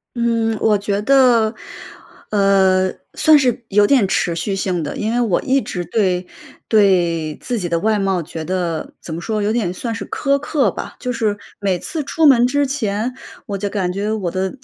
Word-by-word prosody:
嗯， 230 -2 0
我 215 -2 +3
觉 200 0 -2
得， 245 -3 +4 0.8
呃， 190 -2 +3 0.2
算 310 -1 +5
是 250 -2 0
有 205 0 +4
点 260 -7 +4
持 170 -3 0
续 185 +4 -2
性 180 -3 -1
的。 145 - -5
因 220 +2 -2
为 245 - +1
我 205 -7 +1
一 270 +1 +1
直 175 -7 -5
对 180 -1 0 0.4
对 175 -7 +2
自 245 -2 -3
己 180 -5 -3
的 170 0 0
外 215 +3 +1
貌 195 -3 0
觉 160 +1 -7
得， 175 -2 -3
怎 160 - -7
么 170 - -6
说 215 +2 -2
有 210 +2 0
点 210 -7 -1
算 230 +4 -4
是 225 - -6
苛 280 0 +1
刻 280 -5 0
吧。 - - -7
就 250 - -3
是 215 -3 -1 0.2
每 190 -3 0
次 315 - -4
出 320 +3 0
门 250 -5 +6
之 285 +3 +1
前， 235 -3 -2 0.3
我 200 -5 -4
就 200 +1 -3
感 185 -3 -2
觉 205 +2 -2
我 205 -5 -2
的 190 +6 -3
205 Hz, 210 characters per minute, -19 LUFS, 185-235 Hz, 0.8 s, 门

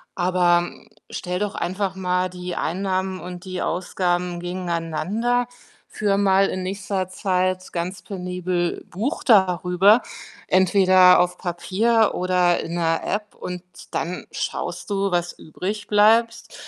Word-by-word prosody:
Aber, 175 -1 +2 0.4
stell 180 0 -3
doch 205 0 -2
einfach 190 +1 -2
mal 180 -1 0
die 180 -1 -6
Einnahmen 190 +2 -2
und 180 0 -8
die 185 -1 -4
Ausgaben 175 0 -1
gegeneinander. 180 +7 -1 0.4
Führe 200 -2 0
mal 195 -1 +4
in 185 - -3
nächster 195 0 -3
Zeit 185 -1 -1
ganz 180 +2 -4
penibel 180 -2 -3
Buch 235 - -3
darüber, 190 0 +4 0.5
entweder 185 -1 +5
auf 180 0 +1
Papier 205 +6 +1
oder 180 -1 +2
in 170 - -5
der 165 -1 0
App 210 0 -3
und 180 -1 -7 0.3
dann 175 +2 -3
schaust - - -4
du, 200 0 +1
was 175 0 0
übrig 200 +7 -6
bleibst. 225 - +3
185 Hz, 120 wpm, -22 LUFS, 180-200 Hz, 0.5 s, entweder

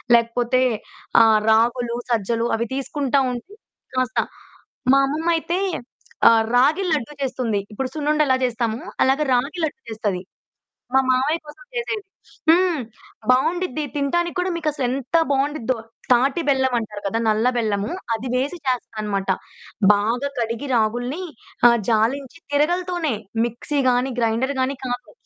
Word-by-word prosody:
లేకపోతే 240 +2 +2 0.6
ఆ - - +6 0.3
రాగులు, 235 +1 +2 0.2
సజ్జలు 230 +1 +1
అవి 235 0 -2
తీసుకుంటా 275 0 0
ఉంటే 285 - -7 0.4
కాస్త 255 -1 +1 0.7
మా 275 - +6
అమ్మమ్మయితే 330 +4 0 0.7
ఆహ్, 225 -1 +5
రాగి 295 +10 +4
లడ్డు 295 -1 -1
చేస్తుంది. 245 -6 -1
ఇప్పుడు 255 +5 -3
సున్నుండెలా 300 -2 +2
చేస్తామో, 235 -1 -2 0.2
అలాగా 270 +3 +3
రాగి 280 +8 -1
లడ్డు 295 - -6
చేస్తది. 205 -4 -2 0.7
మా 265 - +7
మామయ్య 265 +6 +2
కోసం 300 +12 -13
చేసేది. 450 -3 -2 0.5
హ్మ్. 345 -3 +4 0.5
బావుండిద్ది 310 +3 +1
తినటానికి 345 +5 0
కూడా 365 +1 0
మీకసలెంత 275 -3 -1
బావుండిద్దో. 270 -3 0 0.4
తాటి 265 +6 +3
బెల్లమంటారు 240 -6 0
కదా! 225 +3 0
నల్ల 220 +3 +3
బెల్లము 210 -2 0 0.2
అది 230 +3 -4
వేసి 275 +7 0
చేస్తాదనమాట. 215 -6 -2 0.7
బాగా 230 +7 0
కడిగి 235 +4 -2
రాగుల్ని 245 +9 0 0.5
ఆహ్, 235 - +4
జాలించి 255 +7 0
తిరగలితోనే 345 -1 +1 0.3
మిక్సీ 240 +5 -3
గాని, 250 +2 +1
గ్రైండరు 235 +5 0
గాని 265 +1 0
కాదు. 245 0 -5
255 Hz, 120 wpm, -22 LUFS, 230-295 Hz, 0.7 s, మా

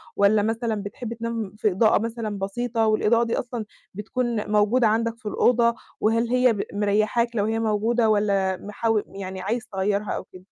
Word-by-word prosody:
والّا 205 +1 +4
مثلًا 225 +1 -1
بتحب 225 +3 -6
تنام 230 -3 -4
في 210 -1 +1
إضاءة 215 +4 +3
مثلًا 225 -3 -4
بسيطة، 225 +4 -1
والإضاءة 215 +2 +3
دي 230 - -1
أصلًا 235 -3 -5 0.3
بتكون 220 +1 -2
موجودة 215 +3 +3
عندك 230 +1 0
في 225 - -29
الأوضة، 235 +2 +3 0.2
وهل 230 +2 +1
هي 250 -1 +4
ب 200 - -2
مريّحاك 215 +4 +1
لو 205 -2 +1
هي 225 +1 0
موجودة، 225 +1 +1
والّا 200 -3 +1
محاو 210 +2 -1
يعني 190 -1 -7
عايز 230 +5 -2
تغيّرها 200 +2 -1
أو - - -3
كده؟ 185 0 -15
220 Hz, 170 wpm, -24 LUFS, 205-230 Hz, 0.3 s, والّا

